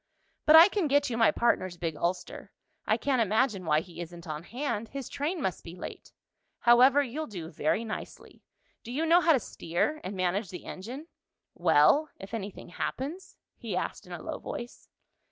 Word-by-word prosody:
"But 305 - +8
I 330 +2 +11
can 400 -5 0
get 285 -1 +2
you 230 - -2
my 225 - +6
partner's 185 -7 +1
big 165 -2 -3
ulster. 175 +4 -3 0.4
I - - +3
can't 265 -4 +1
imagine 215 -2 +1
why 155 -1 +3
he 175 0 -10
isn't 170 0 -9
on 155 -1 -5
hand. 235 - -3
His 270 +1 -6
train 320 +5 -2
must 190 - -2
be 170 +1 -9
late. - - -9 0.5
However, 255 +4 +6
you'll 285 +5 -4
do 170 -6 -7
very 155 +9 0
nicely. 215 - -8 0.4
Do 235 - -8
you 300 +6 0
know 340 +2 +5
how 335 -2 +5
to 270 - +3
steer, 215 - -2
and 190 +1 -5
manage 185 +2 0
the 180 - -8
engine 245 +11 -7 0.5
well, 175 - +4
if 195 +3 -10
anything 200 -4 -6
happens?" 285 - -5 0.2
he - - -5
asked - - -4
in - - -13
a - - -7
low - - -5
voice. 240 - -8
230 Hz, 185 wpm, -29 LUFS, 175-285 Hz, 0.5 s, I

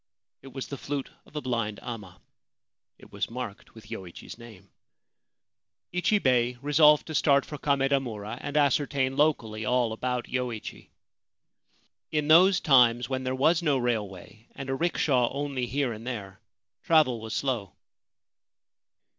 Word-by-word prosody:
It 135 - -13
was 135 0 -5
the 140 - -7
flute 140 -1 -4 0.2
of - - -21
a 150 - -2
blind 115 -5 -2
amma. 105 -7 -8 0.8
It - - -17
was - - -3
marked 115 -4 -7
with 110 -2 -14
Yoichi's 90 -3 -8
name. 110 -5 -14 1.2
Ichibei 130 - +2
resolved 150 +2 +5
to 160 - -7
start 140 -2 +3
for 150 - -8
Kamedamura 135 -7 -1
and 145 +1 -3
ascertain 140 -2 +1
locally 115 -8 +1
all 120 0 +1
about 125 +1 -2
Yoichi. 125 -4 -5 1.2
In 150 -1 -1
those 180 +4 +6
times, 125 -4 +4
when 130 -1 -2
there 130 0 -2
was 160 +6 +3
no 150 -5 +2
railway 110 -3 -4
and 135 -1 -5
a - - 0
rickshaw 135 -6 +1
only 140 -3 -3
here 135 -1 -1
and 115 +2 -10
there, 100 -6 -6 0.4
travel 150 -8 +3
was 110 -1 -5
slow. 120 - -2
130 Hz, 140 wpm, -27 LUFS, 115-145 Hz, 1.2 s, those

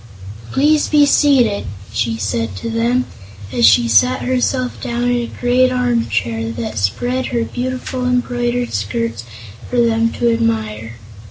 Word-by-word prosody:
"Please 300 +2 +2
be 295 -1 +5
seated," 265 -8 +3 0.3
she 115 0 -1
said 110 -1 -2
to 230 - -5
them, 240 +3 +1 0.5
as 120 -1 +5
she 115 +3 +5
sat 115 +3 +3
herself 255 0 -1
down 240 0 -2
in 245 - +1
a 240 -1 -2
great 250 +1 +3
arm 245 -2 0
chair 115 -1 -1
and 115 -1 -4
spread 245 - -1
her 235 -2 -1
beautiful 255 +1 -4
embroidered 245 -1 -1
skirts 115 +2 -3 0.4
for 245 - 0
them 230 -1 +2
to 235 -1 +1
admire. 220 - -2
235 Hz, 145 wpm, -17 LUFS, -, 0.5 s, be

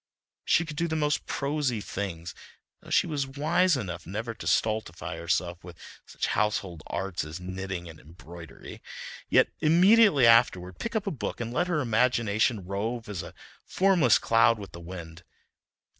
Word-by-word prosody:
She 165 - +2
could 155 -2 -8
do 170 0 0
the 160 - -2
most 150 -1 0
prosy 140 -4 -1
things 90 -5 -5 0.5
(though - - -14
she - - +3
was 145 -4 -2
wise 160 +5 +2
enough 90 -8 -6
never 110 +5 -4
to 95 -7 -8
stultify 90 -1 -1
herself 85 +1 -2
with 85 -1 -11 0.3
such - - -3
"household 100 -6 -1
arts" 95 -2 -3
as 80 +3 -7
knitting 95 -1 -5
and 80 -2 -11
embroidery), 85 +2 -12 0.5
yet - - +4
immediately 180 - +5
afterward 95 -6 +4
pick 230 - -4
up 215 - 0
a 200 - -1
book 115 -9 -5
and 115 0 -4
let 175 +7 +1
her 170 -4 0
imagination 115 -3 +1
rove 110 +5 -3
as 100 -4 -4
a - - -10 0.3
formless 180 - +3
cloud 115 0 +3
with 100 -2 -9
the 85 - -10
wind. 85 -1 -9
110 Hz, 160 wpm, -27 LUFS, 90-145 Hz, 0.5 s, immediately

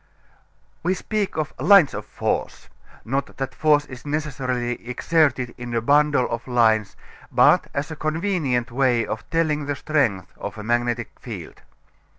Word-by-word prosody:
We 180 +3 +1
speak 210 -1 -2
of 155 -1 -2
lines 195 -9 +6
of - - -6
force, - - -3 0.4
not 135 +4 -3
that 135 -1 -3
force 150 -1 +3
is 125 -3 -10
necessarily 130 -5 -2
exerted 140 -2 +1
in 120 -1 -5
a 115 - +1
bundle 145 -1 +3
of 115 +1 -4
lines 110 -4 +2 0.4
but - - +5
as 145 +3 -3
a - - -4
convenient 155 -7 -1
way 125 -2 +2
of 110 - -6
telling 150 -3 0
the 145 - -1
strength 130 - -1
of 100 +1 -6
a 105 - -6
magnetic 120 0 0
field. 100 -9 -9
135 Hz, 150 wpm, -23 LUFS, 120-150 Hz, 0.4 s, lines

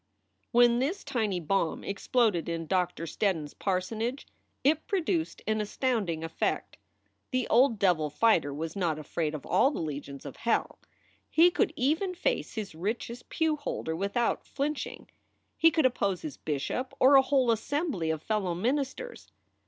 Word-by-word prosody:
When 240 0 +5
this 300 +10 -1
tiny 220 -9 -1
bomb 170 0 0
exploded 200 -3 +1
in 165 -1 -3
Doctor 180 -1 0
Steddon 170 0 0
s 145 - -10
par 190 -2 0
sonage 225 +8 -3 0.4
it 305 +3 +2
produced 340 -3 -1
an 215 0 0
astounding 210 -7 -1
effect. 165 - -2 0.5
The 255 -2 0
old 240 -1 +4
devil 175 -6 +2
fighter 160 -3 +3
was 155 +3 -5
not 170 -6 0
afraid 155 +1 -2
of 150 - -8
all 190 +10 +4
the 290 - -4
legions 145 -3 -5
of 140 - -8
hell. 235 - 0 0.5
He 345 +2 +6
could 400 +2 +1
even 320 +8 0
face - - -1
his 215 -5 -4
richest 225 +7 -4
pewholder 300 - -1
without 200 +7 0
flinching; 290 +2 -3 0.5
he 330 - +6
could 315 -3 +1
oppose 200 -8 +1
his 155 - -5
bishop 160 - -3
or 265 +2 +6
a 270 - +9
whole 265 -2 +2
assembly 230 - -1
of 160 -1 -2
fellow 200 -5 -1
ministers. 280 - -3
220 Hz, 155 wpm, -29 LUFS, 170-275 Hz, 0.5 s, a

